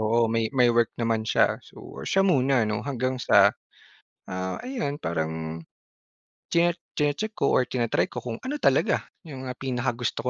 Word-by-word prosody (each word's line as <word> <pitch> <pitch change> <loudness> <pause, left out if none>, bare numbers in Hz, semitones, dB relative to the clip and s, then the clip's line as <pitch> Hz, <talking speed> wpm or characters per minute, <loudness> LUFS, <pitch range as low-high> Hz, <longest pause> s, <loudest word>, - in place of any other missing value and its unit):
oo 115 +2 +3
may 115 -1 +1
may 125 -2 +5
work 115 -1 +3
naman 115 -1 +1
siya. - - +2
So, - - -11
siya 195 - +3
muna, 135 - +3
'no? 105 -1 -1
Hanggang 130 -2 -1
sa, 100 -2 +6 0.8
ah, 95 0 -3
ayun 240 - -3
parang 80 -1 -3 0.9
chi 170 +1 +4 0.3
chini-check 150 +9 0
ko - - +1
or 130 - +3
tina-try 115 -8 0
ko - - -5
kung 115 -2 -4
ano 285 - -2
talaga - - +3 0.2
'yong, 135 -4 -8
ah, 125 - -5
pinaka 130 -1 -1
gusto 120 -1 -2
120 Hz, 165 wpm, -26 LUFS, 110-140 Hz, 0.9 s, sa